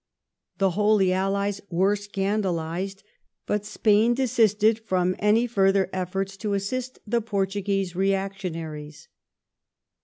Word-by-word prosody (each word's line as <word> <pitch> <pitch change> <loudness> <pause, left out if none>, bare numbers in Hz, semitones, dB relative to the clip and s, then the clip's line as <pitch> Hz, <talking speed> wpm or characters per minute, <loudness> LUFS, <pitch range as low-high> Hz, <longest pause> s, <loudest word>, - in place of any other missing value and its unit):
The 195 -1 +2
Holy 205 -1 +3
Allies 200 +1 -1
were 190 +4 +2
scandalized, 195 -2 -2 0.4
but 210 0 -1
Spain 215 +2 +3
desisted 220 -4 +3
from 185 -4 0
any 215 +3 +3
further 195 -4 +2
efforts 190 +1 -3
to 205 0 -2
assist 255 +6 -3
the 235 +2 0
Portuguese 195 -3 -1
reactionaries. 180 -6 -3
195 Hz, 100 wpm, -25 LUFS, 190-210 Hz, 0.4 s, Holy